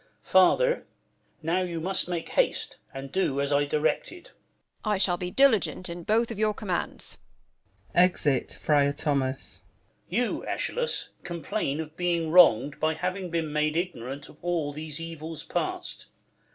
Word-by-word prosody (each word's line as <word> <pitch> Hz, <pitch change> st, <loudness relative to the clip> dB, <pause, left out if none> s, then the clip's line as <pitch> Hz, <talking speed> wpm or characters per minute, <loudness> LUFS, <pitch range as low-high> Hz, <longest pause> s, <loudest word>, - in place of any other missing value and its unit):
Father, -, -, +4 dB, 0.6 s
now 170 Hz, +4 st, +1 dB
You 175 Hz, -2 st, -3 dB
must 185 Hz, +2 st, 0 dB
make 170 Hz, -2 st, -3 dB
haste, -, -, +1 dB
and 135 Hz, 0 st, -7 dB
do 140 Hz, -7 st, +1 dB
as 140 Hz, +1 st, +1 dB
I 145 Hz, 0 st, +3 dB
directed. 155 Hz, -, -1 dB
Frl -, -, -16 dB, 0.5 s
Tho. 215 Hz, -, -1 dB
I 210 Hz, -, +2 dB
shall 185 Hz, -2 st, +2 dB
be 180 Hz, 0 st, -3 dB
diligent 220 Hz, -6 st, +3 dB
in 170 Hz, +1 st, -6 dB
both 230 Hz, +2 st, +2 dB
of 215 Hz, -, -6 dB
your 215 Hz, -1 st, +2 dB
Commands. 190 Hz, -5 st, -3 dB, 0.8 s
[Exit 160 Hz, -7 st, +3 dB
Friar 145 Hz, -2 st, +3 dB
Thomas. 140 Hz, -3 st, -2 dB, 0.5 s
Duke. 190 Hz, -, +1 dB
You, 245 Hz, -, -1 dB
Eschalus, 485 Hz, 0 st, -1 dB
complain 165 Hz, -4 st, -2 dB
of 155 Hz, -1 st, -6 dB
being 170 Hz, -2 st, 0 dB
wrong'd 145 Hz, -6 st, +6 dB
By 155 Hz, 0 st, +1 dB
having 185 Hz, +2 st, -3 dB
been 165 Hz, -3 st, -2 dB
made 150 Hz, +1 st, +1 dB
ignorant 140 Hz, -6 st, -4 dB
of -, -, -16 dB
all 165 Hz, -4 st, -1 dB
These 155 Hz, +1 st, -3 dB
evils 165 Hz, -1 st, -6 dB
past. -, -, -3 dB
165 Hz, 150 wpm, -27 LUFS, 150-185 Hz, 0.8 s, wrong'd